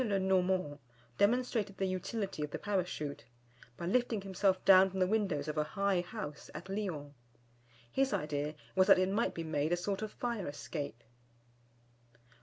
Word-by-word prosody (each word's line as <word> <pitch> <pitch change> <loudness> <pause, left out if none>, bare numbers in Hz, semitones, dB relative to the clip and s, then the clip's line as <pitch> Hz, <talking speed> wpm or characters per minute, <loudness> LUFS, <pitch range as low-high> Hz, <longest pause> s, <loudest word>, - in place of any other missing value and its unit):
le 205 -5 +1
Normand 185 -5 +1 0.4
demonstrated 215 -2 +2
the 195 - 0
utility 190 -2 -2
of 150 - -3
the - - -4
Parachute; 180 -8 -2 0.5
by 170 - -5
lifting 230 +2 +1
himself 190 -1 +1
down 190 0 +8
from 190 0 -5
the 185 - +4
windows 190 -8 0
of 150 0 -1
a - - +3
high 195 +2 +1
house 150 -4 -7
at 170 +5 -7
Lyons. 180 -8 -3 0.8
His 270 0 +2
idea 150 0 -1 0.2
was 190 0 +5
that 195 -2 +8
it 185 0 +2
might 210 +4 0
be 165 - -3
made 155 0 -1
a 175 - +3
sort 195 +3 -2
of 215 -1 -4
fire 235 -6 -3
escape. 145 -3 -5
185 Hz, 165 wpm, -33 LUFS, 155-200 Hz, 0.8 s, down